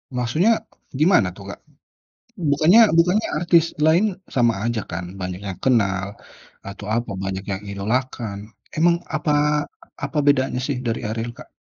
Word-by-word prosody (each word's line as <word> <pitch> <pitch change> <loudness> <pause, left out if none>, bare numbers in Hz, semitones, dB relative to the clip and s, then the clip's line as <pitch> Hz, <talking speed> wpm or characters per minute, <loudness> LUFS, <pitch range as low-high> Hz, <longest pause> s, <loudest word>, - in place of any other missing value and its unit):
Maksudnya, 160 - +2 0.4
gimana 170 +5 +4
tuh - - -11
Kak? - - -10 0.9
Bukannya 160 +9 +5 0.2
bukannya 180 +6 +3
artis 170 -1 +4 0.2
lain, 180 +6 +3 0.2
sama 120 -2 +3
aja 120 -1 -1
kan 85 +2 -4
banyak 90 0 -5
yang 95 - -5
kenal, 100 -7 +2 0.6
atau 100 +1 -8
apa 115 -2 -2
banyak 95 0 -3
yang 95 +1 -3
idolakan. 110 +1 -2 0.4
Emang 170 +2 +4 0.2
apa 150 0 0 0.7
apa 145 +2 -3
bedanya 130 -3 +2
sih 140 -3 -1
dari 115 0 -1
Ariel 115 +2 -3
Kak? - - -12
125 Hz, 140 wpm, -22 LUFS, 100-160 Hz, 0.9 s, Bukannya